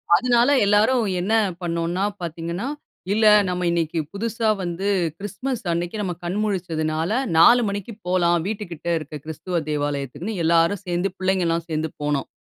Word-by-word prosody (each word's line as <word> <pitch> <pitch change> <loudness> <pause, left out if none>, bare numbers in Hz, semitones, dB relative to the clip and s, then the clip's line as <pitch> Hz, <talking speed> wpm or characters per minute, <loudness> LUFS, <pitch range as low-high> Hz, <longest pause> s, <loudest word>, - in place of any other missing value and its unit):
அதுனால 245 +4 +3 0.2
எல்லாரும் 220 +4 +3 0.2
என்ன 205 +5 -1 0.3
பண்ணோம்ன்னா, 170 +2 -1 0.2
பாத்தீங்கன்னா, 170 +6 -4 0.5
"இல்ல 220 +1 +2 0.2
நம்ம 180 0 -1
இன்னைக்கு 165 -1 0
புதுசா 225 +2 -1
வந்து 175 +3 -3 0.3
கிறிஸ்துமஸ் 225 +4 -4
அன்னைக்கு 175 +5 -3
நம்ம 180 -3 -2
கண் 180 +4 -2
முழிச்சதுனால, 165 -4 -1 0.3
4:00 240 +9 +7
மணிக்கு 205 +3 -5
போலாம். 175 -1 +3
வீட்டு 210 -1 -3
கிட்ட 170 0 -8
இருக்க 150 -1 -8
கிறிஸ்துவ 170 +2 -3
தேவாலயத்துக்குன்னு" 145 - -3
எல்லாரும் 170 +4 +3
சேந்து, 175 +2 -1
பிள்ளைங்க 190 -1 +1
எல்லாம் 165 0 0
சேந்து 155 0 -2
போனோம். 145 -2 -1
175 Hz, 140 wpm, -23 LUFS, 165-205 Hz, 0.5 s, 4:00